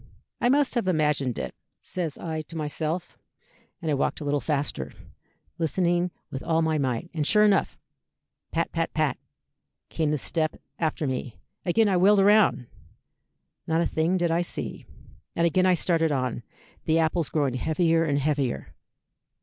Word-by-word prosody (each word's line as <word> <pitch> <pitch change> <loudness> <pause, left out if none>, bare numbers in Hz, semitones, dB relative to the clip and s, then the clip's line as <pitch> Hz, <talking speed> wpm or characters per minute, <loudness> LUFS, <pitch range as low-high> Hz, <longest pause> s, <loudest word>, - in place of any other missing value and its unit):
'I 245 - +3
must 280 +1 +3
have 235 -6 0
imagined 150 -7 +1
it,' - - -4 0.3
says 170 -5 -4
I 160 -2 -4
to 165 - -10
myself, 155 +3 -3 0.6
and 160 - 0
I - - +2
walked 140 - 0
a - - -6
little 145 0 +1
faster, 140 - -2 0.7
listening 175 +2 +1 0.2
with 135 - -4
all 165 0 +1
my 160 -1 +1
might, 130 +5 -2
and 155 -3 -1
sure 210 0 +5
enough 205 -2 +2 0.7
pat, - - -1
pat, - - -1
pat, - - +1 0.7
came 160 -2 0
the 150 - +1
step 155 +2 -1 0.2
after 160 -1 -1
me. 130 -4 -3 0.3
Again 215 +5 +4
I 190 -2 +2
wheeled 200 +3 +5
round. 200 - +4 1.0
Not 160 +1 +2
a - - +2
thing 165 +4 +1
did 175 -2 +1
I 170 +1 +2
see. 175 - -5 0.5
And 170 - +2
again 185 +2 +3
I 185 - +5
started 165 -2 +1
on, 130 -3 -1 0.4
the 160 0 +3
apples 165 0 +1
growing 145 -5 0
heavier 165 +5 +2
and 145 -3 +1
heavier. 140 -3 -1
160 Hz, 160 wpm, -26 LUFS, 145-175 Hz, 1.0 s, sure